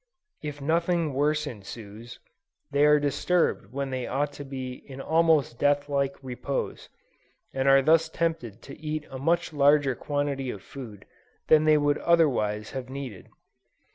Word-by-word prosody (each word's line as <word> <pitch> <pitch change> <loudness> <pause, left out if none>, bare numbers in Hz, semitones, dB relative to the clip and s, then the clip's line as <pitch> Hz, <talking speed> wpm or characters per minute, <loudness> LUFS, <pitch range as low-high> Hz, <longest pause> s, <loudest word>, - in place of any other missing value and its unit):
If 145 -1 -6
nothing 170 0 +1
worse 150 +3 +1
ensues, 110 -1 -9 0.5
they 145 +1 +4
are 150 0 +6
disturbed 145 - 0
when 135 +1 -3
they 130 -1 -3
ought 145 +2 -1
to 145 - -8
be 130 -2 -6
in 135 -1 -9
almost 160 -5 +2
death 145 0 +2
like 140 -1 0
repose, 130 +2 -4 0.6
and 135 0 0
are 135 0 +6
thus 160 +3 +4
tempted 125 -10 -3
to 140 - -11
eat 155 0 -4
a 130 - -6
much 170 +3 0
larger 145 -1 +4
quantity 145 0 -2
of 100 -5 -7
food 110 -8 -10 0.4
than 155 0 +6
they 155 -1 +5
would 145 0 +1
otherwise 115 -11 +2
have 130 -1 -6
needed. 130 -8 -7
140 Hz, 150 wpm, -27 LUFS, 130-150 Hz, 0.6 s, are